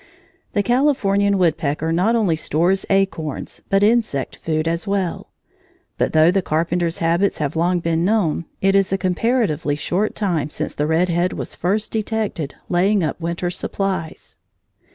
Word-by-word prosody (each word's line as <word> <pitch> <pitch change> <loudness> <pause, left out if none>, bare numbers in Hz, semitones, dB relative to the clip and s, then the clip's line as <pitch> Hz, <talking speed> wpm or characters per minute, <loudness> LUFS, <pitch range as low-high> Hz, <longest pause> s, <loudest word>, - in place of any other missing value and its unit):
The 205 - +1
Californian 205 -6 +2
woodpecker 160 -3 0
not 185 +8 +2
only 205 -8 +2
stores 175 +5 0
acorns, 165 -7 -1
but 195 +1 +3
insect 215 - +1
food 155 0 -2
as 170 +4 -2
well. 195 -3 -2 0.7
But - - +1
though 160 +2 +5
the 195 +1 +1
Carpenter's 170 +1 -1
habits 170 +4 +1
have 145 -1 -2
long 175 +2 +1
been 165 0 0
known, 180 -5 +1 0.2
it 195 0 +3
is 195 -1 +3
a 195 - +2
comparatively 185 - 0
short 180 +7 -1
time 170 -8 -1
since - - -4
the 150 - -1
red 165 +3 +2
head 175 +2 +1
was - - -5
first 205 +4 -1
detected 215 -9 -2
laying 190 +2 +2
up 160 - -3
winter 170 +1 -2
supplies. 185 -2 -4
180 Hz, 155 wpm, -20 LUFS, 165-200 Hz, 0.7 s, though